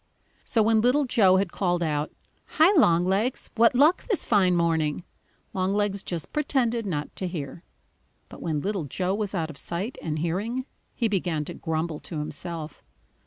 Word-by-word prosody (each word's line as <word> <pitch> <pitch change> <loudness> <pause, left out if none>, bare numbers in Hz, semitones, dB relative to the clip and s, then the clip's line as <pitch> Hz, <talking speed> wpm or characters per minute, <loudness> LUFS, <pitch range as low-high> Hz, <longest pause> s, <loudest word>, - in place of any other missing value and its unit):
So 225 - +2
when 220 0 +3
Little 260 +5 +3
Joe 195 -7 +4
had 190 -2 0
called 175 -3 0
out: 150 -1 -1 0.5
"Hi, 320 +5 +7
Longlegs, 195 - +2
what 230 +2 +4
luck 300 +7 +4
this 410 -8 0
fine 190 -5 +3
morning?" 165 -2 +1 0.5
Longlegs 200 +1 0
just 170 -4 -5
pretended 240 -7 0
not 150 -5 -3
to 185 - -2
hear. 165 -2 -6 0.6
But - - -12
when 155 -3 -1
Little 195 -3 -2
Joe 180 +6 -1
was 205 -1 -2
out 165 -3 -2
of 140 - -12
sight 190 +9 -4
and 155 -1 -3
hearing, 205 +11 -2 0.3
he 235 - +1
began 175 -7 -1
to - - -6
grumble 160 -1 -3
to 165 - -7
himself. 160 +1 -5
185 Hz, 165 wpm, -26 LUFS, 165-225 Hz, 0.6 s, Hi